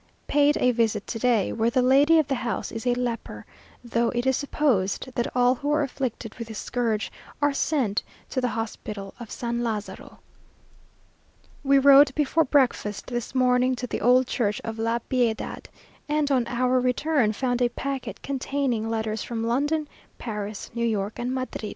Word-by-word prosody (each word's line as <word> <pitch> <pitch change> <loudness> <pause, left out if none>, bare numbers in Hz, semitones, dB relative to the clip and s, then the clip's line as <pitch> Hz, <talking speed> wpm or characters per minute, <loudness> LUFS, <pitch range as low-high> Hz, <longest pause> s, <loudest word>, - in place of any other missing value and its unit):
Paid 290 +1 +3
a 250 - +3
visit 225 -3 0
to 225 - -5
day, 230 -5 +2
where 225 +1 +1
the 250 +1 +2
lady 280 +5 +5
of 310 -3 +3
the 275 - 0
house 235 - -3
is 225 +2 -5
a 245 - +3
leper; 245 -2 -4 0.4
though 235 0 0
it 240 +1 -2
is 265 0 +3
supposed 260 -5 0
that 240 - -1
all 250 0 +4
who 290 +3 -3
are 300 0 +2
afflicted 250 -5 -4
with 230 - -5
this 220 -1 -7
scourge 230 -4 -1 0.3
are 290 0 +2
sent 265 -8 0 0.3
to 255 - -1
the 250 - +1
hospital 215 -3 -5
of 235 -3 -8
San 235 0 -3
Lazaro.... 215 -3 -5 1.5
We 275 0 +4
rode 275 0 +7
before 305 +2 +2
breakfast 255 -7 +1
this 240 0 -5
morning 255 0 +3
to 250 - -4
the 245 - -4
old 250 +4 +5
church 210 -4 -1
of 225 0 -5
La 230 +1 +1
Piedad, 240 -4 -1 0.4
and, 300 -1 +1
on 250 -3 +2
our 255 +1 +1
return, 255 -1 +1
found 245 +3 -1
a 245 - +3
packet 270 +2 -5
containing 265 -4 -1
letters 220 -1 -2
from 230 -2 -4
London, 290 +6 0 0.3
Paris, 210 -2 -5
New 235 0 -2
York, 210 -2 -1
and 245 +1 -2
Madrid. 255 -4 -4
245 Hz, 175 wpm, -25 LUFS, 225-270 Hz, 1.5 s, rode